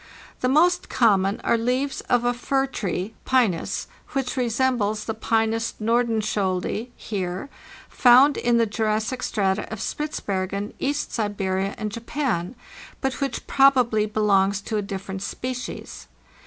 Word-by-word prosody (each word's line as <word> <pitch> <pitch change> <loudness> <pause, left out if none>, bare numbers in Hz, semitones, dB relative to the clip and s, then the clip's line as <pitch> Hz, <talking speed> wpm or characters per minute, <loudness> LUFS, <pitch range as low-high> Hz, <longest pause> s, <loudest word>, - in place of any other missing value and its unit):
The 255 - +1
most 350 +6 +3
common 200 -4 +3
are 235 - +2
leaves 255 +4 -1
of 245 -1 +3
a 245 - +2
fir 270 +2 0
tree 200 -5 -3
(Pzzas) 230 -11 +1 0.3
which 265 -2 -1
resembles 240 -4 0
the 225 - -2
P2zzs 225 +1 0
Nordenskioldi 215 -2 0
(Heer) 190 +3 -4 0.4
found 260 +3 +6
in 240 -1 +2
the 230 - +4
Jurassic 220 +3 -1
strata 195 -2 -1
of 220 - -5
Spitzbergen, 200 -9 -3
East 285 +1 -1
Siberia, 195 -3 -1
and 215 -1 -3
Japan, 230 - -2 0.4
but 265 0 -2
which 275 -2 -2
proba 270 -3 +5
bly 215 -2 0
belongs 200 -2 +2
to 215 +2 -3
a - - +1
different 195 -1 -5
species. 250 +4 -5
225 Hz, 130 wpm, -24 LUFS, 200-255 Hz, 0.4 s, found